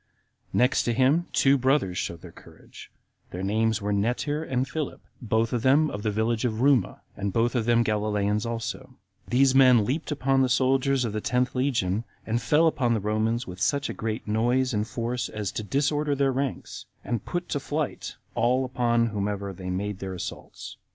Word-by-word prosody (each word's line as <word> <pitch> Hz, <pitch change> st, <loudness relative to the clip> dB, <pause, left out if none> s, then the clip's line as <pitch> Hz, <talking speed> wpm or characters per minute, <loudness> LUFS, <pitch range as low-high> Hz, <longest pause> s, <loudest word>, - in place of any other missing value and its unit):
Next 125 Hz, +2 st, +3 dB
to 120 Hz, -, 0 dB
him, 140 Hz, +8 st, +3 dB
two 135 Hz, 0 st, +3 dB
brothers 130 Hz, -8 st, +1 dB
showed 85 Hz, -1 st, -4 dB
their 90 Hz, -, -10 dB
courage; -, -, -15 dB, 0.4 s
their 90 Hz, +1 st, -6 dB
names 110 Hz, +2 st, 0 dB
were 105 Hz, 0 st, 0 dB
Netir 125 Hz, +9 st, 0 dB
and 130 Hz, -4 st, -1 dB
Philip, 155 Hz, 0 st, -4 dB, 0.2 s
both 115 Hz, 0 st, 0 dB
of 120 Hz, -, 0 dB
them 145 Hz, +5 st, +4 dB
of 105 Hz, -, -5 dB
the 110 Hz, -, 0 dB
village 110 Hz, +2 st, 0 dB
Ruma, 125 Hz, +3 st, +1 dB
and 100 Hz, 0 st, -3 dB
both 115 Hz, +3 st, +1 dB
of 120 Hz, -4 st, 0 dB
them 120 Hz, 0 st, +3 dB
Galileans 105 Hz, -1 st, 0 dB
also; 115 Hz, +3 st, -5 dB, 0.3 s
these 130 Hz, +2 st, +3 dB
men 130 Hz, -5 st, +6 dB
leaped 150 Hz, +7 st, -2 dB
upon 135 Hz, -2 st, +1 dB
the 130 Hz, -, +2 dB
soldiers 130 Hz, 0 st, +2 dB
of 110 Hz, -, -3 dB
the 110 Hz, -, -2 dB
tenth 125 Hz, +3 st, 0 dB
legion, 115 Hz, -6 st, 0 dB, 0.2 s
and 115 Hz, +2 st, -1 dB
fell 150 Hz, +8 st, +3 dB
upon 125 Hz, -7 st, +2 dB
the -, -, 0 dB
Romans 110 Hz, +3 st, -1 dB
with 90 Hz, 0 st, -9 dB
such 140 Hz, +6 st, +1 dB
a 110 Hz, 0 st, -3 dB
noise 120 Hz, +4 st, +1 dB
and 105 Hz, +1 st, -1 dB
force 120 Hz, +2 st, -3 dB
as 105 Hz, -3 st, -4 dB
to -, -, -4 dB
disorder 145 Hz, +5 st, 0 dB
their 135 Hz, -1 st, +2 dB
ranks, 135 Hz, 0 st, -4 dB, 0.2 s
and 120 Hz, -4 st, -3 dB
to -, -, -13 dB
put 175 Hz, 0 st, -2 dB
to 145 Hz, -, -1 dB
flight 150 Hz, +2 st, -4 dB, 0.2 s
all 125 Hz, +3 st, +2 dB
upon 120 Hz, -2 st, +1 dB
whomsoever 100 Hz, -2 st, -3 dB
they 90 Hz, 0 st, -7 dB
made 100 Hz, +2 st, -3 dB
their 95 Hz, -1 st, -5 dB
assaults. 90 Hz, -, -8 dB
120 Hz, 185 wpm, -26 LUFS, 105-135 Hz, 0.4 s, men